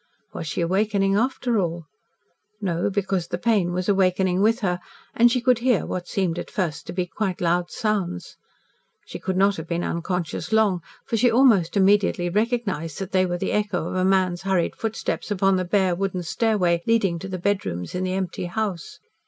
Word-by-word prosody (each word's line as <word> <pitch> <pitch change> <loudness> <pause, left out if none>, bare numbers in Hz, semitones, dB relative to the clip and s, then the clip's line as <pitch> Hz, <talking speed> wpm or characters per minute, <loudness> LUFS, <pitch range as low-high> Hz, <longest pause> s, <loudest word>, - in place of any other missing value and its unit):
Was - - -5
she 165 - -2
awakening, 195 +2 +1
after 240 0 +1
all? 170 -2 -2 0.7
No, 175 -4 -1
because 190 -3 -1
the - - -3
pain 210 -7 +1
was 180 +1 -2
awakening 190 -2 +2
with 225 +3 +3
her, 180 -3 0 0.3
and 240 +1 +5
she 250 - +2
could 245 -1 +3
hear, 245 -3 +2
what 180 -1 -4
seemed 180 -3 -1
at - - -6
first 175 -7 -3
to - - -4
be 180 0 -1
quite 185 +2 -3
loud 175 0 +1
sounds. 200 - -2 0.7
She - - -8
could 190 -1 -2
not 195 +1 +3
have 160 0 -6
been 170 +1 -2
unconscious 170 0 -3
long, 210 -5 +3 0.2
for 230 - -1
she 245 +3 +4
almost 225 -8 +4
immediately 195 -2 +3
recognised 205 - -1
that 195 -1 -5
they 185 -1 +3
were 175 0 -2
the - - -2
echo 205 -5 -1
of - - -5
a 185 - +1
man's 185 -2 +2
hurried 190 -3 0
footsteps 220 -1 -3
upon 195 -1 +2
the 185 - -1
bare 185 0 +2
wooden 185 0 -2
stairway, 180 -2 +1
leading 200 -7 +2
to 195 - -6
the 185 -1 -4
bedrooms 175 - -2
in 180 +1 -2
the 185 0 -1
empty 185 -2 -3
house. 185 -2 -3
190 Hz, 190 wpm, -23 LUFS, 175-210 Hz, 0.7 s, and